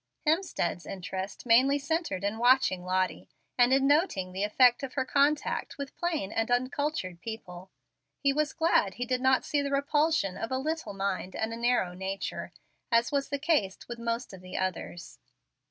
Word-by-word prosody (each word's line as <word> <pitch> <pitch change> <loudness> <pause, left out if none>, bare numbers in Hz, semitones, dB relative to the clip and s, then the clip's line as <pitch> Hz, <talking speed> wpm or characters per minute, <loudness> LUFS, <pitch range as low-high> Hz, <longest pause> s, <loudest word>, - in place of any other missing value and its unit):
Hemstead's 305 - 0
interest 190 +2 -6
mainly 255 +4 +5
centred 290 - -2
in 205 +2 -1
watching 245 -7 +4
Lottie, 185 0 -1 0.3
and 245 0 +4
in 270 0 +4
noting 285 - +2
the 190 +2 -3
effect 240 +4 +4
of 270 -2 -5
her 260 -2 0
contact 285 +2 +1
with 280 -1 -6
plain 325 - -2
and 225 +1 -1
uncultured 250 - -1
people. 190 -5 -8 0.5
He 275 -1 +2
was 305 +1 0
glad 205 - +2
he 245 - -3
did 255 +1 -1
not 260 0 +3
see 290 - +1
the 280 - -2
repulsion 285 - +1
of 225 - -4
a 260 - +1
little 310 -5 -3
mind 195 -1 -3
and 220 +1 -2
a - - -3
narrow 235 -6 +1
nature, 190 +1 -4 0.4
as 235 +3 +3
was 280 -1 0
the 285 - -1
case 280 - +1
with 235 -1 -7
most 235 -1 -3
of 190 - -10
the 185 0 -7
others. 175 -3 -4
245 Hz, 175 wpm, -29 LUFS, 190-280 Hz, 0.5 s, mainly